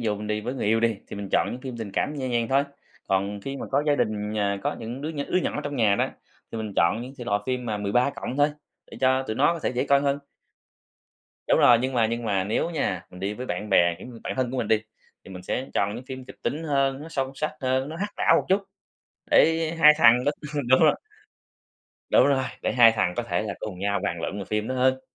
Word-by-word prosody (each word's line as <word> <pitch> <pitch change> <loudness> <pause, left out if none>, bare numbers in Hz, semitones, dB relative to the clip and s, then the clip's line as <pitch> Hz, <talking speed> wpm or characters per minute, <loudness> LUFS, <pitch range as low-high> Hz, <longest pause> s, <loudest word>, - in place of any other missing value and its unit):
dụ 105 -3 -1
mình 105 - -6
đi 105 0 -1
với 125 +5 -4
người 125 - -3
yêu 115 +1 +3
đi, 115 -2 +1
thì - - -7
mình 100 -1 -6
chọn - - +3
những 125 - -7
phim 130 -2 -6
tình 110 -3 -6
cảm 150 - -1
nhẹ 130 -3 -3
nhàng 120 -2 0
thôi, 135 +1 +3 0.4
còn 100 +1 0
khi 135 +6 -5
mà - - -6
có 140 +2 +2
gia 145 - +4
đình, 110 -4 -1
à, 100 -1 0
có - - -1
những 120 +3 -6
đứa 155 +3 -3
nh - - -10
đứa 185 - +3
nhỏ - - -2
trong 145 0 -4
nhà 105 -5 +3
đó, - - 0 0.4
thì 115 - -4
mình 110 -2 -4
chọn 85 +7 +3
những 130 +2 -8
thể 120 - -6
loại 105 -4 0
phim 125 -1 -2
mà 105 -2 -2
13 125 +7 +1
cộng 130 - -6
thôi, 145 +1 +3 0.4
để - - -10
cho 130 0 +3
tụi 110 -4 -4
nó 150 +5 +4
có 170 - -5
thể - - 0
dễ 125 +2 -1
coi 140 0 +4
hơn. 140 0 0 1.3
Đúng - - +4
rồi, 120 -1 +7
nhưng 130 +1 -1
mà 115 -2 +3
nhưng 115 +1 -3
mà 95 -3 0
nếu 110 - -1
nha, 95 - -1
mình 90 - -12
đi 100 +2 -2
với 125 +3 -6
bạn 90 +2 -4
bè, 85 -2 +4
kiểu, - - -10 0.2
bạn - - -2
thân 130 -2 0
của 130 - -4
mình 110 - -2
đi, 110 -1 +3 0.4
thì - - -12
mình 90 -1 -9
sẽ 125 +8 -3
chọn 100 +1 +1
những 125 - -8
phim 130 -1 -7
kịch - - -12
tính 155 - -2
hơn, 135 -2 +1
nó 160 - -9
sâu 135 -4 -2
sắc 155 - -2
hơn, 130 +1 0
nó 160 - -6
hack 205 +4 -4
não - - +4
một - - 0
chút, 195 +2 +3 0.7
để 165 0 +4
hai 150 -1 +9
thằng 125 -4 +6
đó 145 - +2 0.2
ừm, 140 -4 -2
đúng 130 +1 +5
rồi. 155 - +5 1.1
Đúng - - +5
rồi, 135 -2 +2 0.2
để - - 0
hai 120 -2 +7
thằng 90 -5 0
có - - 0
thể 90 -5 -1
là 105 -2 -4
cùng 100 -4 -6
nhau 100 +1 0
bàn 85 -5 -2
luận 100 - -4
về 100 - -4
phim 105 +2 -2
đó 130 - -2
hơn. 130 +1 +2
120 Hz, 270 wpm, -25 LUFS, 105-135 Hz, 1.3 s, hai